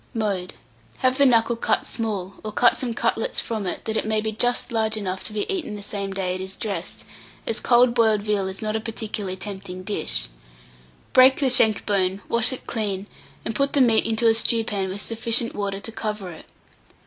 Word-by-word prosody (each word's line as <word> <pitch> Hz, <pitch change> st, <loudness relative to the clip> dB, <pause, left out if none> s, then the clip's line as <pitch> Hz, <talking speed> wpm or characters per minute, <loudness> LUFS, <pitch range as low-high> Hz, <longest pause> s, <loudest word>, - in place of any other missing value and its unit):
] -, -, -33 dB
Mode. 185 Hz, -3 st, -2 dB, 0.5 s
Have 255 Hz, +1 st, +3 dB
the 280 Hz, -, +7 dB
knuckle 235 Hz, -1 st, +3 dB
cut 230 Hz, -, 0 dB
small, 200 Hz, -4 st, -3 dB
or 215 Hz, -, -4 dB
cut 240 Hz, +3 st, +4 dB
some 240 Hz, -3 st, -2 dB
cutlets -, -, 0 dB
from 215 Hz, -4 st, -3 dB
it, -, -, -5 dB
that 220 Hz, -, -2 dB
it 215 Hz, -, -1 dB
may 220 Hz, 0 st, +1 dB
be 220 Hz, 0 st, -2 dB
just 245 Hz, +3 st, 0 dB
large 220 Hz, -1 st, +1 dB
enough 190 Hz, -2 st, -3 dB
to -, -, -1 dB
be 210 Hz, -1 st, -1 dB
eaten 335 Hz, -, -3 dB
the 205 Hz, -, -8 dB
same 200 Hz, -1 st, -4 dB
day 190 Hz, -2 st, -1 dB
it 185 Hz, -, -4 dB
is 190 Hz, 0 st, -5 dB
dressed, 210 Hz, -3 st, -3 dB, 0.4 s
as 230 Hz, -, +1 dB
cold 240 Hz, 0 st, +4 dB
boiled 220 Hz, -3 st, +3 dB
veal 205 Hz, -2 st, 0 dB
is 190 Hz, +3 st, -6 dB
not 215 Hz, 0 st, -1 dB
a -, -, +1 dB
particularly 215 Hz, -4 st, -3 dB
tempting 190 Hz, -2 st, -6 dB
dish. -, -, -1 dB, 0.9 s
Break 260 Hz, +1 st, +7 dB
the 270 Hz, -3 st, +2 dB
shank 220 Hz, -4 st, +3 dB
bone, 195 Hz, -1 st, 0 dB
wash 235 Hz, +2 st, +3 dB
it 260 Hz, -, -6 dB
clean, 200 Hz, -4 st, -2 dB, 0.4 s
and 225 Hz, -, -2 dB
put 275 Hz, +4 st, 0 dB
the 285 Hz, -, +3 dB
meat 230 Hz, -3 st, +4 dB
into 225 Hz, +1 st, 0 dB
a 225 Hz, -, +6 dB
stewpan 220 Hz, -4 st, +1 dB
with 195 Hz, +2 st, -5 dB
sufficient 230 Hz, +1 st, -1 dB
water 200 Hz, -1 st, -3 dB
to 225 Hz, -, -6 dB
cover 210 Hz, -4 st, -4 dB
it. 160 Hz, -, -12 dB
215 Hz, 210 wpm, -23 LUFS, 195-230 Hz, 0.9 s, the